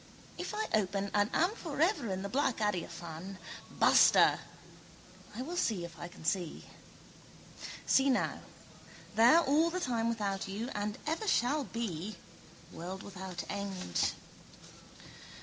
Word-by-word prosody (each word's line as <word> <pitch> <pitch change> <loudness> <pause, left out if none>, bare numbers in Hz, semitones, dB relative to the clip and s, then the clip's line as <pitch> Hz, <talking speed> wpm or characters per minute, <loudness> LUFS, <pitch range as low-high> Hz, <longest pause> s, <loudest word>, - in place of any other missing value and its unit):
If - - -5
I 435 +1 0
open 200 -1 +1
and 205 0 +3
am 350 +4 +3
for 330 -10 -6
ever 325 - +2
in 190 +1 -3
the - - -2
black 260 +2 +1
adiaphane. 175 -2 -3 0.3
Basta! - - +6 1.0
I 250 - -3
will 340 +6 -5
see 210 - 0
if 165 -2 -11
I 175 - -5
can 175 - -13
see. 175 -2 -1 1.2
See 270 +1 +4
now. 255 - +1 0.7
There 235 +10 +7
all 315 +3 +3
the 365 +2 -2
time 230 -7 0
without 200 -4 -2
you: 210 +6 -4
and 205 0 -2
ever 325 +8 -2
shall 280 - +2
be, 215 -4 -4 0.6
world 185 +3 -6
without 190 -2 -6
end. 190 - -1
210 Hz, 130 wpm, -32 LUFS, 190-270 Hz, 1.2 s, There